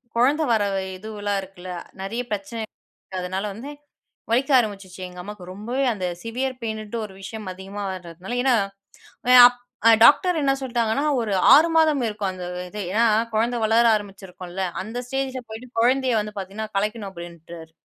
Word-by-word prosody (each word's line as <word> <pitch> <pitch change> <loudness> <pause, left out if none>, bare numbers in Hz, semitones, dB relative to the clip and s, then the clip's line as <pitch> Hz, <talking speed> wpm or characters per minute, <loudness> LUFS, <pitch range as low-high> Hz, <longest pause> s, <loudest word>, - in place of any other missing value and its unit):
குழந்த 280 +6 +3
வர 215 -2 +3 0.3
இதுவெலாம் 205 -1 -3
இருக்குல. 185 -1 -10 0.3
நிறைய 225 +6 -3
பிரச்சனை 210 +3 -4 0.3
இருக்கு. 190 - -12
அதனால 190 +3 -3
வந்து 265 +7 -8 0.6
வலிக்க 270 +5 +2
ஆரம்பிச்சுச்சு, 195 -5 -3
எங்க 180 0 -10
அம்மாக்கு. 205 -1 -9
ரொம்பவே 240 +7 -2
அந்த 185 -3 -3 0.2
சிவ்வியர் 255 +3 -3
பெயினுன்ட்டு 220 0 -4
ஒரு 195 - -15
விஷயம் 215 +1 -7
அதிகமா 195 +2 -7
வரதுனால 180 +5 -7
ஏன்னா, 260 -2 +4 0.9
அப் 245 0 +4 0.4
டாக்டர் 345 +2 +6
என்ன 275 -1 +3
சொல்லிட்டாங்கன்னா, 240 +2 0 0.2
ஒரு 210 -3 -2 0.2
6 320 +3 +6
மாதம் 305 -5 +4
இருக்கும், 205 -3 -2
அந்த 180 -1 -7 0.2
இது. 210 +1 -6
ஏன்னா, 230 +2 +4 0.3
குழந்த 235 +3 +1
வளர 225 +2 +4
ஆரம்பிச்சிருக்கும்ல. 190 -2 -6 0.2
அந்த 225 +4 -5
ஸ்டேஜில 265 -1 -2
போயிட்டு 230 +3 -9
குழந்தைய 255 -2 +3
வந்து 210 0 -8
பாத்தீங்கன்னா 205 +3 -6
கலைக்கணும், 210 0 -2
அப்பிடீன்றாரு. 170 -2 -10
215 Hz, 150 wpm, -23 LUFS, 190-245 Hz, 0.9 s, டாக்டர்